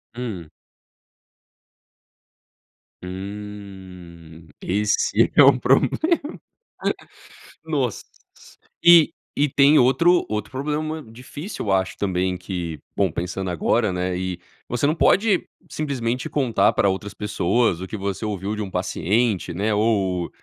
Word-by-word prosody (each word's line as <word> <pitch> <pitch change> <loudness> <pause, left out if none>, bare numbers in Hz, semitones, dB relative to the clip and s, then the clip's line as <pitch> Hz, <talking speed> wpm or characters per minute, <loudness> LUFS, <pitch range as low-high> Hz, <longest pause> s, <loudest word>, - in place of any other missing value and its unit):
Hum. 100 -11 -6 2.5
Hum, 95 -4 -9
esse 105 +3 +1
é 145 - +8
o 135 -2 +6
problema, 135 +3 +3 1.7
nossa, - - -2 0.8
e 170 -2 +7 0.2
e 145 - +3
tem 145 +3 +5
outro 165 +8 +4
outro 105 +3 -3
problema 150 +3 -3
difícil 130 - -8
eu - - +1
acho 95 -1 0
também 95 -2 -1
que, 90 -4 -5 0.2
bom, 100 -3 +2
pensando 90 +3 -4
agora, 95 +4 +1
né, 90 0 -2
e 90 -1 -4 0.3
você 120 +3 -1
não 155 - +2
pode 200 +2 +3 0.2
simplesmente 130 -5 -3
contar 130 -6 +2
pra 100 - +2
outras 95 +1 -4
pessoas 105 -1 0
o 95 - -5
que 110 - -6
você 100 +2 -3
ouviu 100 -1 -3
de 105 - -4
um 100 - -4
paciente, 95 +2 0
né, 105 +5 0
ou, 100 -5 0
105 Hz, 120 wpm, -22 LUFS, 90-125 Hz, 2.5 s, é